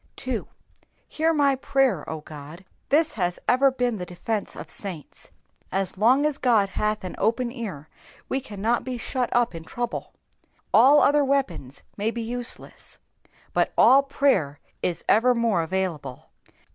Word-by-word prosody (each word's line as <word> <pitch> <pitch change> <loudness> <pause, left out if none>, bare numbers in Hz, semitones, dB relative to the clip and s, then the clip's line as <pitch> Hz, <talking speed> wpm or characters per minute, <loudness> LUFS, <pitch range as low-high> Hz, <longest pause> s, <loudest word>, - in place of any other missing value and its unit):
2. - - -4 0.6
^'^Hear 325 +1 +1
my 285 -2 +4
prayer, 265 - +1
0 160 -1 -5
Ood^ 155 +4 -10 0.3
This 310 +3 +3
has 180 -4 -1
ever 270 +2 +5
been 245 -3 -1
the 180 - -5
defence 205 +4 -3
of - - -8
saints. 180 -7 -7 0.4
As 195 0 +1
long 250 +8 +4
as 300 -2 0
God 220 -6 +3
hath 210 +1 -1
an 185 - -5
open 235 +3 +1
ear 200 - -7 0.4
we 270 - -1
cannot 220 0 -1
be 255 -1 -4
shut 250 +1 -2
up 240 -3 +2
in 165 -1 -7
trouble. 240 +8 -5 0.6
All 290 +3 +7
other 290 0 +4
weapons 270 - -2
may 210 +2 0
be 230 0 -4
useless, 240 +1 -5 0.6
but - - +1
all 270 +1 +7
prayer 270 - +1 0.2
is 175 - -2
evermore 230 -5 +3
available. 160 -7 -4
230 Hz, 145 wpm, -25 LUFS, 185-265 Hz, 0.6 s, All